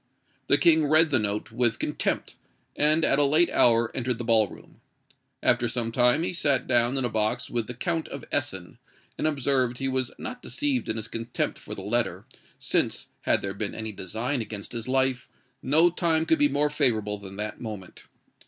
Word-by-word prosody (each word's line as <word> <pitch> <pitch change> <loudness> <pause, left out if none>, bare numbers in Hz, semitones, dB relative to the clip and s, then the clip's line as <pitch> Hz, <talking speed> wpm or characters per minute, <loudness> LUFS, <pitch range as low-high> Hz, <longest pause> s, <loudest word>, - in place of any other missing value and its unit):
The 140 - +4
King 160 -2 +4
read 155 +1 +4
the 130 - +4
note 105 +1 -2
with 120 0 +1
contempt, - - -2 0.4
and 155 +2 +3
at 140 - +3
a - - +5
late 155 +5 +3
hour 115 -1 +3
entered 125 -2 -1
the 120 - -5
ball 110 -2 +3
room. - - -15 0.6
After 120 0 +3
some 115 -1 -2
time 125 +6 +3
he 180 - -2
sat 145 -5 +1
down 120 +1 +2
in 130 - 0
a - - +2
box 110 -1 -2
with 120 -3 -2
the 125 - -7
Count 165 +6 -2
of 140 - -8
Essen, 110 -8 -2 0.4
and - - +1
observed 135 -4 0
he 135 - -2
was 130 -2 -1
not 250 -1 -6
deceived 285 -4 -1
in 110 - 0
his 110 -1 -4
contempt 115 +1 -3
for - - -8
the 95 - -8
letter, 120 +4 -1 0.3
since, - - 0 0.2
had - - +3
there 100 0 -2
been 100 +1 -3
any 110 0 -5
design 110 +8 -3
against 105 -2 -7
his 115 -1 -6
life, 130 -1 0 0.3
no 160 +6 +4
time 165 -2 +1
could 320 - +2
be 290 0 +4
more 150 - +1
favourable 110 -8 0
than 100 -1 -10
that 105 +1 -5
moment. 105 -5 -8
125 Hz, 195 wpm, -26 LUFS, 110-145 Hz, 0.6 s, a